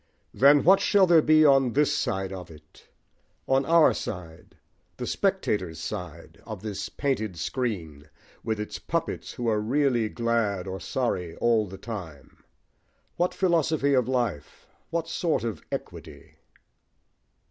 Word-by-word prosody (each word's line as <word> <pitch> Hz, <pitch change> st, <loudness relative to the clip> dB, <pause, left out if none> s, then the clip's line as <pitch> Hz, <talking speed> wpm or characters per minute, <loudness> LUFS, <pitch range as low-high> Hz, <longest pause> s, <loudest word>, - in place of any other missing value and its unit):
Then 140 Hz, +2 st, +5 dB
what 190 Hz, +4 st, +6 dB
shall 200 Hz, -2 st, +4 dB
there 170 Hz, -3 st, +5 dB
be 155 Hz, 0 st, +5 dB
on 135 Hz, -4 st, +4 dB
this 145 Hz, +1 st, +2 dB
side 95 Hz, -7 st, -2 dB
of 90 Hz, -2 st, -8 dB
it 75 Hz, -1 st, -17 dB, 0.6 s
on 135 Hz, +1 st, +2 dB
our 165 Hz, -1 st, +5 dB
side, 85 Hz, -4 st, -8 dB, 0.4 s
the -, -, -4 dB
spectators' 90 Hz, -6 st, -1 dB
side, 80 Hz, -1 st, -7 dB
of 110 Hz, -3 st, -8 dB
this 105 Hz, -3 st, -4 dB
painted 110 Hz, -, -2 dB
screen, 80 Hz, -, -4 dB, 0.3 s
with 110 Hz, -2 st, -2 dB
its 105 Hz, -, -5 dB
puppets 165 Hz, 0 st, -3 dB
who 120 Hz, -2 st, -4 dB
are 110 Hz, -2 st, +1 dB
really 120 Hz, -1 st, +1 dB
glad 115 Hz, -6 st, -1 dB
or 95 Hz, 0 st, -5 dB
sorry 90 Hz, -10 st, -2 dB
all 115 Hz, -3 st, +2 dB
the 95 Hz, +1 st, -9 dB
time? 90 Hz, -12 st, -9 dB, 0.7 s
what 175 Hz, +1 st, +1 dB
philosophy 160 Hz, -5 st, +1 dB
of 125 Hz, -3 st, +2 dB
life, 120 Hz, -, -3 dB, 0.2 s
what 165 Hz, -1 st, -2 dB
sort 165 Hz, -7 st, -1 dB
of 110 Hz, -8 st, -4 dB
equity? -, -, -8 dB
115 Hz, 135 wpm, -26 LUFS, 95-140 Hz, 0.7 s, what